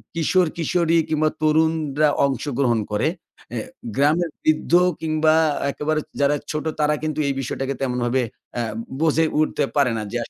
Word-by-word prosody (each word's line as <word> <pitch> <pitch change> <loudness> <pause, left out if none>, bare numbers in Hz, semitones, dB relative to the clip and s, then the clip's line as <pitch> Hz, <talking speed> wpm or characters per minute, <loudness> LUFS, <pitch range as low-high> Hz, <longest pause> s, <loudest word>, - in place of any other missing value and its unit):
কিশোর-কিশোরী 170 0 +1
কিংবা 155 0 +2
তরুণরা 155 -1 +2 0.2
অংশগ্রহণ 135 -3 0
করে, 105 +7 +1 0.4
অ্যা - - -3 0.3
গ্রামের 155 +5 +2
বৃদ্ধ 155 0 +1 0.3
কিংবা 155 0 +2 0.4
একেবারে 155 +2 -1 0.2
যারা 140 +1 +3 0.2
ছোট, 150 -1 -3
তারা 150 0 +3
কিন্তু 155 -1 -2
এই 140 - +1
বিষয়টাকে 135 +1 -3
তেমনভাবে 125 -1 0 0.4
আ - - +1 0.4
বুঝে 160 0 +3
উঠতে 155 - +1
পারে 140 -4 +3
না 110 - -3
যে - - -1
আস - - -11
155 Hz, 140 wpm, -22 LUFS, 135-155 Hz, 0.4 s, যারা